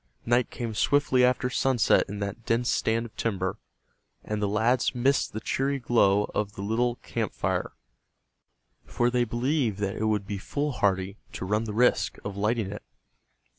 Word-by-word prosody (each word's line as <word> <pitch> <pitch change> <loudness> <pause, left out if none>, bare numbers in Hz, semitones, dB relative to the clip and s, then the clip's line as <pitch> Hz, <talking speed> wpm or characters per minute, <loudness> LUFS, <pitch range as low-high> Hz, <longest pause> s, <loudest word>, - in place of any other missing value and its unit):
Night 120 +1 +2
came 115 -2 -5
swiftly 130 +2 +3
after 125 0 +3
sunset 125 -1 +3
in 100 - -5
that 100 +3 -5
dense 120 +2 +1
stand 115 +1 +1
of 115 - -12
timber, 95 -5 -2 0.6
and 105 -1 -3
the 105 - +1
lads 115 +5 +1
missed 130 +3 +2
the 110 - -4
cheery 135 +5 -1
glow 110 -5 +3
of 100 -1 -2
the 100 - -7
little 120 +3 +1
camp - - -3
fire, - - -1 1.1
for 120 0 0
they 120 -1 +2
believed 120 -1 0
that 100 -1 -2
it 110 - -1
would 105 -2 0
be 100 0 -4
foolhardy 100 -8 -1 0.2
to - - -5
run 105 +4 0
the 110 - -4
risk 125 +3 +2
of 100 -1 -4
lighting 105 0 0
it. 105 - -7
115 Hz, 170 wpm, -27 LUFS, 100-125 Hz, 1.1 s, swiftly